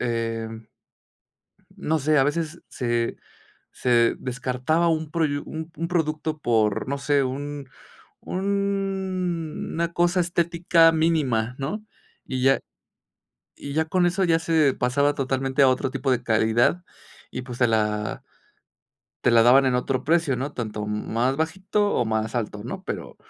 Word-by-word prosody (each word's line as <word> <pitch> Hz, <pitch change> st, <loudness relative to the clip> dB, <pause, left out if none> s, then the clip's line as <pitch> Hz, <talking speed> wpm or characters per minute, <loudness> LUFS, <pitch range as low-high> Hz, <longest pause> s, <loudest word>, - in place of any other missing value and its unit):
eh, 115 Hz, -1 st, -2 dB, 1.3 s
no 160 Hz, +1 st, 0 dB
sé, 150 Hz, +2 st, +2 dB
a 135 Hz, -, +5 dB
veces 165 Hz, +3 st, -2 dB
se 120 Hz, -1 st, -1 dB, 0.6 s
se 120 Hz, -2 st, +2 dB
descartaba 130 Hz, +6 st, 0 dB
un 155 Hz, -1 st, -1 dB
proyu 155 Hz, -4 st, 0 dB
u 160 Hz, +1 st, -6 dB
un 170 Hz, +1 st, -2 dB
producto 155 Hz, -2 st, -1 dB
por, 110 Hz, -5 st, +1 dB
no 140 Hz, -, -1 dB
sé, 140 Hz, 0 st, +2 dB
un 140 Hz, +1 st, -5 dB, 0.5 s
una 190 Hz, -4 st, -2 dB
cosa 175 Hz, +1 st, +2 dB
estética 170 Hz, -1 st, +3 dB
mínima, 145 Hz, -8 st, +1 dB
¿no?, 200 Hz, +11 st, -3 dB, 0.4 s
y 130 Hz, -1 st, -3 dB
ya 135 Hz, 0 st, +4 dB, 1.0 s
y 140 Hz, 0 st, -7 dB
ya 160 Hz, +1 st, +1 dB
con 180 Hz, +2 st, +1 dB
eso 190 Hz, +2 st, 0 dB
ya 165 Hz, -1 st, +3 dB
se 160 Hz, -4 st, +2 dB
pasaba 140 Hz, +4 st, +1 dB
totalmente 135 Hz, 0 st, 0 dB
a 135 Hz, -, +7 dB
otro 130 Hz, 0 st, 0 dB
tipo 135 Hz, 0 st, -2 dB
de 120 Hz, -1 st, 0 dB
calidad 115 Hz, +9 st, +2 dB, 0.5 s
y, 125 Hz, -, -5 dB
pues, 125 Hz, -1 st, -8 dB
te 120 Hz, -, +4 dB
la 105 Hz, -1 st, -1 dB, 1.0 s
te -, -, +4 dB
la 115 Hz, -1 st, +6 dB
daban 130 Hz, +3 st, +6 dB
en 125 Hz, -1 st, +2 dB
otro 130 Hz, +1 st, -1 dB
precio, 165 Hz, -4 st, +2 dB
¿no?, 135 Hz, +4 st, -3 dB
tanto 105 Hz, -4 st, -4 dB
más 115 Hz, +5 st, -1 dB
bajito 190 Hz, +6 st, 0 dB
o 120 Hz, -, +2 dB
más 110 Hz, +1 st, -2 dB
alto, 105 Hz, -3 st, -3 dB
¿no?, 185 Hz, +10 st, -6 dB
pero -, -, -6 dB
140 Hz, 145 wpm, -24 LUFS, 125-165 Hz, 1.3 s, a